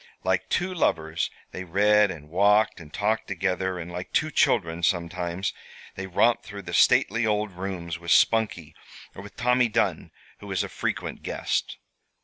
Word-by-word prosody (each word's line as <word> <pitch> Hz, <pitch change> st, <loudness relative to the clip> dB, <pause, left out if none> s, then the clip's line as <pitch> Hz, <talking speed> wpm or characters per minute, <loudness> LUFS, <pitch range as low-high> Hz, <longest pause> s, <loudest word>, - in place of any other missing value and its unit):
Like 95 Hz, 0 st, 0 dB
two 185 Hz, +1 st, 0 dB
lovers 80 Hz, -, 0 dB, 0.2 s
they 95 Hz, -, -6 dB
read 105 Hz, +4 st, +3 dB
and 75 Hz, -5 st, -8 dB
walked 105 Hz, +4 st, +3 dB
and 75 Hz, -3 st, -12 dB
talked 110 Hz, +5 st, -1 dB
together, 95 Hz, -1 st, -1 dB
and 85 Hz, 0 st, -7 dB
like 90 Hz, +1 st, -6 dB
two 155 Hz, +1 st, +1 dB
children, 85 Hz, -, +1 dB
sometimes, 85 Hz, +1 st, -1 dB, 0.4 s
they 95 Hz, 0 st, -6 dB
romped 115 Hz, +6 st, +2 dB
through 100 Hz, -1 st, -9 dB
the 85 Hz, -1 st, -7 dB
stately 115 Hz, +6 st, +4 dB
old 105 Hz, -1 st, 0 dB
rooms 90 Hz, -2 st, -5 dB
with 85 Hz, 0 st, -8 dB
Spunkie, 90 Hz, -8 st, +2 dB, 0.4 s
or -, -, -9 dB
with 100 Hz, -, -13 dB
Tommy 125 Hz, 0 st, +3 dB
Dunn, 110 Hz, -, 0 dB, 0.3 s
who 105 Hz, -, -11 dB
was 95 Hz, -2 st, -1 dB
a -, -, -6 dB
frequent -, -, -4 dB
guest. -, -, -2 dB
95 Hz, 160 wpm, -25 LUFS, 85-105 Hz, 0.4 s, stately